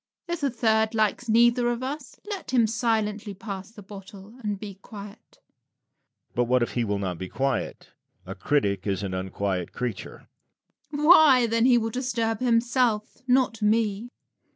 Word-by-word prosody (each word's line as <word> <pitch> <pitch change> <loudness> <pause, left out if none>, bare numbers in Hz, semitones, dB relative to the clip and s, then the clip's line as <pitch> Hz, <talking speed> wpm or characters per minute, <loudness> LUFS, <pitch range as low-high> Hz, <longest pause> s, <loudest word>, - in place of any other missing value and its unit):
If 345 -1 -3
a 280 - +1
third 220 -2 +1
likes 220 +2 0
neither 240 +2 +4
of 240 +1 -3
us, 275 +1 -6
let 400 -4 -6
him 245 -3 +3
silently 220 -2 -1
pass 195 -2 -7
the 215 -2 -13
bottle 195 +1 -12
and 205 -1 -2
be 200 -2 -9
quiet. 205 -2 -12
Lucian. - - -49
But 120 - +1
what 125 0 +2
if - - -3
he 120 - -1
will 105 -2 -1
not 95 -3 -4
be 95 0 -6
quiet? 135 -1 -2 0.4
A - - -6
critic 100 -10 0
is 100 0 -1
an 95 -2 -3
unquiet 95 -1 -3
creature. 115 -5 -6 0.6
Rabelais. 300 0 -1
Why, 300 -8 +7
then 230 +1 +2
he 245 -2 +5
will 225 -1 -1
disturb 230 -3 -1
himself, 235 -2 +1
not 250 -3 +2
me. 215 +1 +1
220 Hz, 165 wpm, -25 LUFS, 185-240 Hz, 0.6 s, Why